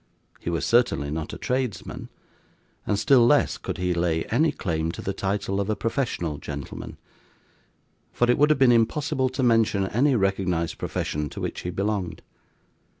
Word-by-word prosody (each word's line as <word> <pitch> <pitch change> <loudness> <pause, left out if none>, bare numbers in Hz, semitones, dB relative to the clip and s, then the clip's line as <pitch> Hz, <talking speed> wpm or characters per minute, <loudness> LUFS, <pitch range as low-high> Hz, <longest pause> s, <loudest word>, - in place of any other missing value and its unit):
He - - -4
was 85 -1 -1
certainly 95 - +2
not 80 0 -4
a - - -6
tradesman, 125 -4 -3 0.8
and 105 - +1
still 120 +4 +5
less 120 - +3
could - - -5
he 90 0 0
lay 85 -1 0
any 155 +7 +3
claim 80 - -2
to - - -7
the 100 - -2
title 100 0 -1
of 100 - -3
a 110 - +1
professional 115 - -2
gentleman; 70 -2 -7 1.1
for 120 - +1
it 125 - +3
would 150 +1 +5
have 155 - +4
been 130 -2 +5
impossible 130 +3 +1
to 130 +1 -3
mention 115 -5 +3
any 130 +8 +2
recognised 95 -5 0
profession 75 0 -3
to - - -8
which - - -4
he 90 - -4
belonged. 95 -2 -2
100 Hz, 165 wpm, -25 LUFS, 85-120 Hz, 1.1 s, still